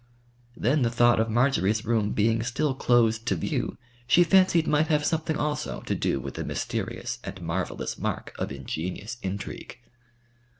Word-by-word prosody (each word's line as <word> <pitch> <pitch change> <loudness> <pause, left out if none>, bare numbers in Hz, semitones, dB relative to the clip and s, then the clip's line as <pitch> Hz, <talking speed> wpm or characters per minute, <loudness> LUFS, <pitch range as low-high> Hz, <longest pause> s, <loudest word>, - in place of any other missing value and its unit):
Then 135 +6 +2
the 120 - +3
thought 120 0 +4
of 115 0 +1
Marjory's 110 -3 +2
room 110 -2 +1
being 110 +2 +2
still 130 +5 0
closed 115 -3 +2
to 95 - +2
view 80 - -2 0.3
she 175 +8 +6
fancied 180 -2 +4
might 150 +1 +2
have 150 -1 +2
something 160 0 0
also 150 0 -2
to - - -2
do - - 0
with 70 0 -6
the - - -4
mysterious - - -3
and 100 - -7
marvellous 90 +2 -3
mark - - -3
of - - -2
ingenious 85 - -5
intrigue. 100 +4 -6
115 Hz, 160 wpm, -26 LUFS, 105-150 Hz, 0.3 s, she